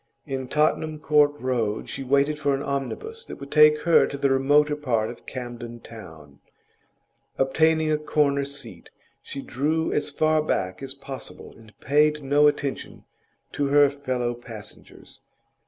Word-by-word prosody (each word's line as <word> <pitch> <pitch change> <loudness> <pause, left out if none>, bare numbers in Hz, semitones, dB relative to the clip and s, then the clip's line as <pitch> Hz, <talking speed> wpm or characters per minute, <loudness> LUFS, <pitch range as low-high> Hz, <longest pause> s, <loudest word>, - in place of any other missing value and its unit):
In 135 -3 -4
Tottenham 155 +2 0
Court 150 -1 +3
Road 115 -5 -1
she - - -6
waited 140 +3 +1
for 145 -2 +1
an 135 - -4
omnibus 440 - -4
that - - -8
would 140 0 -10
take 150 0 +6
her 170 +1 +4
to 140 - -6
the 140 -1 +1
remoter 145 +3 +3
part 120 -7 -1
of 120 - -15
Camden 120 -2 -7
Town; 80 -12 -13 1.0
obtaining 160 +3 +2
a 150 - +1
corner 145 -2 +1
seat, 140 +1 -9 0.3
she 140 - -7
drew 155 +5 -1
as 150 - -1
far 155 +2 +2
back 95 -10 -2
as 135 0 -4
possible, 135 -1 -10
and 110 -2 -19
paid 150 +1 +2
no 145 +2 +4
attention 145 -2 -3 0.5
to 145 - -1
her 145 0 +5
fellow 130 -4 -2
passengers. 115 -3 -11
140 Hz, 150 wpm, -24 LUFS, 125-150 Hz, 1.0 s, take